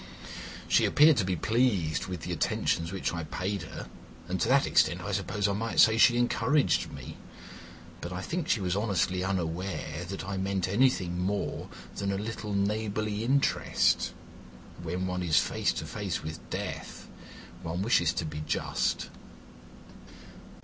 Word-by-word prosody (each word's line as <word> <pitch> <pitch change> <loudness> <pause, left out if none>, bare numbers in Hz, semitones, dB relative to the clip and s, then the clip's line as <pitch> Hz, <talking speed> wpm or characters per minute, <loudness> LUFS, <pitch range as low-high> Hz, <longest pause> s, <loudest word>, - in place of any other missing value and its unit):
She - - +4
appeared 150 -1 +6
to - - +3
be 90 0 0
pleased 100 -6 +1
with 90 -3 -5
the 90 - -5
attentions 85 0 0
which 95 -3 -2
I 85 -1 -3
paid 95 +5 -3
her, 85 - -8 0.4
and 90 0 -2
to - - +2
that - - +4
extent - - +3
I - - -4
suppose 105 -1 0
I 100 - 0
might 115 +3 -1
say 110 - +7
she 120 0 +6
encouraged 120 +4 +2
me, - - -9 0.8
but 85 - -5
I 90 +1 -4
think 170 - -3
she 110 - +2
was 90 -1 0
honestly 95 -3 0
unaware 90 -2 -2
that 95 0 -5
I 100 -1 -3
meant 95 -1 0
anything 95 -5 +2
more 100 +3 -2 0.3
than 100 0 -1
a 100 - -1
little 105 0 -4
neighbourly 105 +1 -1
interest. 135 +4 +2 0.7
When 90 +2 -2
one 90 0 -2
is 80 -3 +2
face - - +2
to - - -4
face 100 -5 -3
with 80 0 -7
Death - - -5 0.5
one 85 +3 -3
wishes 85 -7 +3
to 80 - -2
be 75 -1 -5
just." - - -1
95 Hz, 155 wpm, -29 LUFS, 90-110 Hz, 0.8 s, say